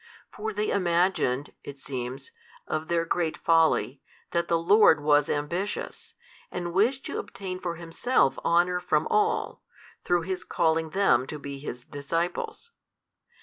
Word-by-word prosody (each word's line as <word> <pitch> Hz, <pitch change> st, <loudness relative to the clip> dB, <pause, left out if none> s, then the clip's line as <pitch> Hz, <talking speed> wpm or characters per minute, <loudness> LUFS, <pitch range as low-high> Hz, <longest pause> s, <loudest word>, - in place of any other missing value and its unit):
For 220 Hz, +1 st, -4 dB
they 210 Hz, 0 st, -1 dB
imagined 170 Hz, -7 st, +1 dB
(it 140 Hz, -, -8 dB
seems) 130 Hz, 0 st, -5 dB, 0.3 s
of 155 Hz, +1 st, -3 dB
their 170 Hz, -1 st, +1 dB
great 165 Hz, -1 st, -1 dB
folly 160 Hz, -5 st, +2 dB, 0.3 s
that 170 Hz, 0 st, 0 dB
the 170 Hz, -, +2 dB
Lord 180 Hz, -1 st, +5 dB
was 145 Hz, -1 st, +3 dB
ambitious, 170 Hz, +8 st, -3 dB, 0.3 s
and 175 Hz, -1 st, -4 dB
wished 235 Hz, +8 st, +2 dB
to -, -, -3 dB
obtain 185 Hz, -2 st, -6 dB
for 175 Hz, -2 st, -3 dB
Himself 170 Hz, -, +1 dB
honour 175 Hz, +1 st, +3 dB
from 160 Hz, -4 st, +1 dB
all, 425 Hz, +1 st, +1 dB, 0.4 s
through 175 Hz, -1 st, +1 dB
His 185 Hz, +1 st, -4 dB
calling 160 Hz, -1 st, +1 dB
them 190 Hz, -7 st, +2 dB
to 150 Hz, -, -5 dB
be 140 Hz, -1 st, -7 dB
His 125 Hz, -3 st, -7 dB
disciples. 165 Hz, -, -3 dB
170 Hz, 140 wpm, -27 LUFS, 150-185 Hz, 0.4 s, Lord